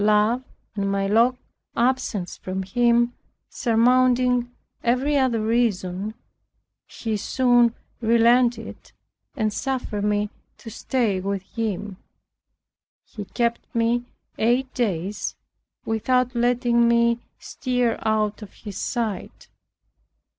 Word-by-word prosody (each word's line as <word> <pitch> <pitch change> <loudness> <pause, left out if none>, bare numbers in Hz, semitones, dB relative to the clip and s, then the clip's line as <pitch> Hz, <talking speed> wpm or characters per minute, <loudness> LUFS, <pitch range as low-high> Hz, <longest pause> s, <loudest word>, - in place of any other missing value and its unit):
Love 210 +4 +3 0.3
and 200 -1 -1
my 195 0 0
long 230 +5 +3 0.4
absence 240 -6 0
from 190 +1 -4
him 240 +4 +2 0.4
surmounting 250 +1 +3 0.3
every 255 +5 +1
other 260 -4 +2
reason, 215 -3 0 0.7
he 225 -2 -4
soon 240 +2 +3 0.3
relented 235 0 +2 0.4
and 215 -5 0
suffered 250 -6 -2
me 210 0 0 0.3
to 225 - -10
stay 220 -5 0
with 195 0 -3
him. 205 -2 -4 1.1
He 205 -2 -8
kept 235 +3 0 0.2
me 235 +1 +1 0.3
eight 250 +4 +1
days 200 -4 -2 0.5
without 250 +3 +1
letting 240 0 +2
me 235 0 +3 0.2
stir 250 -3 -1
out 215 -1 0
of 210 - -9
his 205 -3 -8
sight. 225 -5 -4
230 Hz, 100 wpm, -23 LUFS, 210-245 Hz, 1.1 s, Love